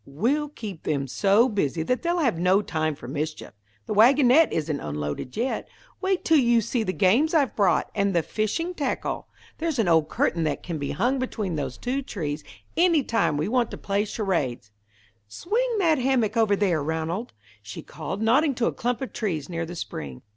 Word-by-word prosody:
"We'll 255 Hz, -, -1 dB
keep 210 Hz, -, -8 dB
them 140 Hz, -2 st, -1 dB
so 200 Hz, -, +3 dB
busy 170 Hz, -, -1 dB
that 250 Hz, +9 st, 0 dB
they'll 345 Hz, +1 st, 0 dB
have 250 Hz, -, +1 dB
no 185 Hz, +4 st, +3 dB
time 155 Hz, -4 st, -1 dB
for 120 Hz, -, -11 dB
mischief. 155 Hz, +3 st, -4 dB, 0.3 s
The -, -, -3 dB
wagonette 260 Hz, +7 st, +5 dB
isn't 155 Hz, -2 st, -1 dB
unloaded 75 Hz, -, -5 dB
yet. 245 Hz, +4 st, -2 dB, 0.3 s
Wait 380 Hz, -1 st, 0 dB
till 320 Hz, -2 st, +5 dB
you 240 Hz, -2 st, +4 dB
see 230 Hz, +2 st, -1 dB
the 210 Hz, -, -1 dB
games 225 Hz, -, +3 dB
I've 285 Hz, -4 st, +2 dB
brought, 200 Hz, -3 st, +2 dB
and 200 Hz, -2 st, 0 dB
the 170 Hz, -, +3 dB
fishing 275 Hz, -, -2 dB
tackle. 285 Hz, -6 st, -3 dB, 0.3 s
There's 320 Hz, -3 st, -1 dB
an 225 Hz, -5 st, +2 dB
old 160 Hz, -2 st, +3 dB
curtain 165 Hz, -1 st, 0 dB
that 150 Hz, -3 st, -2 dB
can 170 Hz, -4 st, -4 dB
be 140 Hz, -, -3 dB
hung 250 Hz, -, 0 dB
between 210 Hz, -8 st, -3 dB
those 135 Hz, -4 st, -4 dB
two 260 Hz, +3 st, -2 dB
trees 155 Hz, -, -4 dB, 0.3 s
any 335 Hz, -4 st, +4 dB
time 225 Hz, -11 st, +1 dB
we 150 Hz, -, -1 dB
want 240 Hz, +1 st, +1 dB
to -, -, -7 dB
play 200 Hz, +1 st, 0 dB
charades." 165 Hz, -, -2 dB, 0.6 s
"Swing 460 Hz, -, -1 dB
that 325 Hz, -7 st, +3 dB
hammock 245 Hz, -4 st, +1 dB
over 220 Hz, -3 st, +3 dB
there, 185 Hz, -6 st, +1 dB
Ranald," 160 Hz, +8 st, -3 dB, 0.3 s
she 105 Hz, 0 st, -8 dB
called, 205 Hz, +3 st, -5 dB
nodding 270 Hz, +5 st, +3 dB
to 240 Hz, -, 0 dB
a -, -, 0 dB
clump 245 Hz, +2 st, -2 dB
of 265 Hz, -, -6 dB
trees 165 Hz, -9 st, -3 dB
near 165 Hz, -1 st, -3 dB
the 175 Hz, -, -7 dB
spring. 70 Hz, -, -6 dB
205 Hz, 190 wpm, -25 LUFS, 160-260 Hz, 0.6 s, wagonette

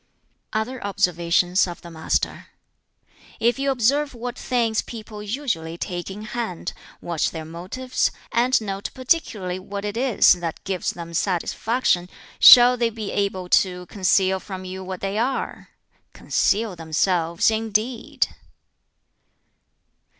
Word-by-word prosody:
Other 230 Hz, +4 st, -3 dB
observations 180 Hz, -1 st, +2 dB
of 175 Hz, 0 st, -8 dB
the 170 Hz, -, -10 dB
Master: 160 Hz, -1 st, -2 dB, 0.9 s
"If 240 Hz, +3 st, +2 dB
you 275 Hz, 0 st, 0 dB
observe 275 Hz, +3 st, +1 dB
what 240 Hz, +1 st, -5 dB
things 230 Hz, -3 st, 0 dB
people 215 Hz, -2 st, -9 dB
(usually) 210 Hz, -, -3 dB
take 175 Hz, +1 st, -4 dB
in 205 Hz, +2 st, -7 dB
hand, 215 Hz, -5 st, -4 dB, 0.3 s
watch 170 Hz, -3 st, -1 dB
their 160 Hz, -1 st, -7 dB
motives, 185 Hz, +11 st, -2 dB, 0.2 s
and 245 Hz, +3 st, +3 dB
note 200 Hz, -2 st, -4 dB
particularly 225 Hz, -, -1 dB
what 200 Hz, +2 st, -6 dB
it 205 Hz, 0 st, -3 dB
is 250 Hz, -1 st, +5 dB
that 175 Hz, -2 st, -5 dB
gives 190 Hz, -2 st, -2 dB
them 170 Hz, -1 st, -8 dB
satisfaction, 185 Hz, +2 st, 0 dB, 0.3 s
shall 245 Hz, 0 st, +10 dB
they 235 Hz, -1 st, +2 dB
be 220 Hz, -2 st, -6 dB
able 195 Hz, -2 st, -1 dB
to 180 Hz, -1 st, -5 dB
conceal 190 Hz, 0 st, +2 dB
from 185 Hz, -1 st, -8 dB
you 190 Hz, +1 st, -6 dB
what 185 Hz, -1 st, -6 dB
they 195 Hz, +2 st, -2 dB
are? 260 Hz, +3 st, -2 dB, 0.4 s
Conceal 210 Hz, -1 st, 0 dB
themselves, 165 Hz, +3 st, +1 dB
indeed! 220 Hz, +2 st, 0 dB
200 Hz, 125 wpm, -23 LUFS, 180-235 Hz, 0.9 s, shall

